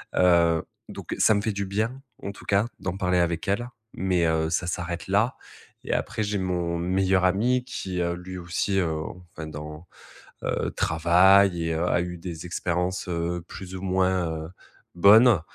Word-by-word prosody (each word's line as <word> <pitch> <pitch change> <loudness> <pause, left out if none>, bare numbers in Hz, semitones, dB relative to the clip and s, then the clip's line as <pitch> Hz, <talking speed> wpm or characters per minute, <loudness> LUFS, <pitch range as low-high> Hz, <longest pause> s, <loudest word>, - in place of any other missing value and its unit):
Heu, 85 -2 +4 0.2
donc, - - -7
ça - - +5
me 100 - +1
fait 110 +1 -1
du 100 0 -3
bien, 110 +7 -2 0.2
en 100 - -3
tout 100 - -14
cas, 100 +2 +2
d'en 95 -1 -3
parler 90 -2 +1
avec 85 -1 0
elle, 120 +5 0 0.3
mais, 90 -2 0
heu, 80 -1 +1
ça 85 +1 -1
s'arrête 85 0 -4
là. 105 +6 +2 0.5
Et - - -2
après, - - -2
j'ai 105 -1 -1
mon 90 -2 -1
meilleur 95 +2 +1
ami 120 +7 +2
qui, 95 -8 -4
heu, 85 0 0
lui 90 +1 -7
aussi, 90 +3 -1
heu, 90 - +1 0.5
enfin 80 - -6
dans 75 +2 -8 0.6
heu, - - -1
travaille 90 +2 +4
et 80 - -1
heu, 80 +2 -1
a 85 - +2
eu 90 0 -4
des 85 -1 -7
expériences, 90 +2 -2
heu, 85 0 -2
plus 95 -1 -9
ou 95 - -6
moins, 90 -4 0
heu, 80 - -9 0.4
bonnes, 105 +3 +7
90 Hz, 180 wpm, -25 LUFS, 85-100 Hz, 0.6 s, bonnes